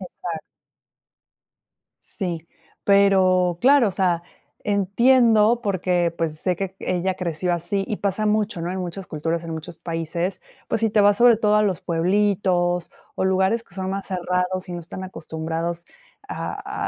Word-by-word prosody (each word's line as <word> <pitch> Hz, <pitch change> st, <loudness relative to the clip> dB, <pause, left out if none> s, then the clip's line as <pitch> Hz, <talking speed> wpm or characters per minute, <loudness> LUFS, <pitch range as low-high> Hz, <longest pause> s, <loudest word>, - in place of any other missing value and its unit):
Exacto. 175 Hz, -3 st, -6 dB, 1.6 s
Sí, 170 Hz, -4 st, -5 dB, 0.4 s
pero, 185 Hz, -3 st, +4 dB
claro, 270 Hz, -1 st, +5 dB
o -, -, -2 dB
sea, 180 Hz, -2 st, 0 dB, 0.4 s
entiendo 225 Hz, +3 st, +4 dB
porque, 180 Hz, -3 st, +1 dB
pues, 165 Hz, -2 st, -1 dB
sé 180 Hz, -2 st, 0 dB
que 190 Hz, +1 st, -4 dB
ella 185 Hz, +1 st, -1 dB
creció 180 Hz, 0 st, -2 dB
así, 175 Hz, +3 st, -1 dB
y 215 Hz, -, -2 dB
pasa 200 Hz, +1 st, -1 dB
mucho, 210 Hz, -4 st, 0 dB
¿no? 175 Hz, -, -2 dB
En 190 Hz, -, -4 dB
muchas 180 Hz, +1 st, -6 dB
culturas, 165 Hz, +2 st, -3 dB
en 165 Hz, -, -6 dB
muchos 160 Hz, +1 st, -7 dB
países, 170 Hz, +2 st, -3 dB, 0.3 s
pues, -, -, -1 dB
si 225 Hz, -, +2 dB
te 210 Hz, -1 st, +3 dB
vas 205 Hz, 0 st, +4 dB
sobre 240 Hz, -2 st, +7 dB
todo 210 Hz, -1 st, +2 dB
a 210 Hz, -, +4 dB
los 190 Hz, -4 st, -1 dB
pueblitos, 180 Hz, 0 st, +1 dB, 0.3 s
o 190 Hz, -, 0 dB
lugares 190 Hz, +4 st, +2 dB
que 175 Hz, -, -19 dB
son 190 Hz, -1 st, -3 dB
más 195 Hz, 0 st, -4 dB
cerrados, 180 Hz, 0 st, -1 dB
y -, -, -5 dB
no 175 Hz, -, -4 dB
están 180 Hz, +3 st, -7 dB
acostumbrados 165 Hz, 0 st, -4 dB, 0.4 s
a 415 Hz, -, -4 dB
185 Hz, 155 wpm, -23 LUFS, 170-200 Hz, 1.6 s, sobre